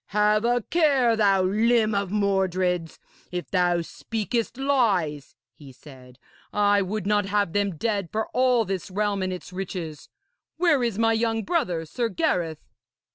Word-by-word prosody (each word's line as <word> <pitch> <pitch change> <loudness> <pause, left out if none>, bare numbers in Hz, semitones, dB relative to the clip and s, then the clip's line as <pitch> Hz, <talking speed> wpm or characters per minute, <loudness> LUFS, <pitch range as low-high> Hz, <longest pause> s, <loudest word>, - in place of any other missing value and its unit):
'Have 210 +1 +2
a 240 -1 +1
care, 275 -8 +3
thou 200 -3 +3
limb 220 +3 +2
of 200 -2 -1
Mordred's, 185 -4 0 0.3
if 180 -1 -5
thou 175 -2 +2
speakest 230 +6 -3
lies,' 205 - 0 0.2
he 140 +2 -14
said. 130 -2 -15 0.3
'I 205 -1 +3
would 200 +1 -3
not 205 0 +2
have 200 -3 0
them 200 -3 0
dead 200 -3 -1
for 220 0 -1
all 250 -2 +2
this 190 0 -4
realm 205 +1 -1
and 185 0 -1
its 180 0 -8
riches. 175 -5 -6 0.5
Where 330 -5 +3
is 230 -4 -1
my 225 0 +3
young 225 0 0
brother, 205 - -1
Sir 230 +9 -2
Gareth?' 175 - -1
205 Hz, 150 wpm, -25 LUFS, 180-230 Hz, 0.5 s, care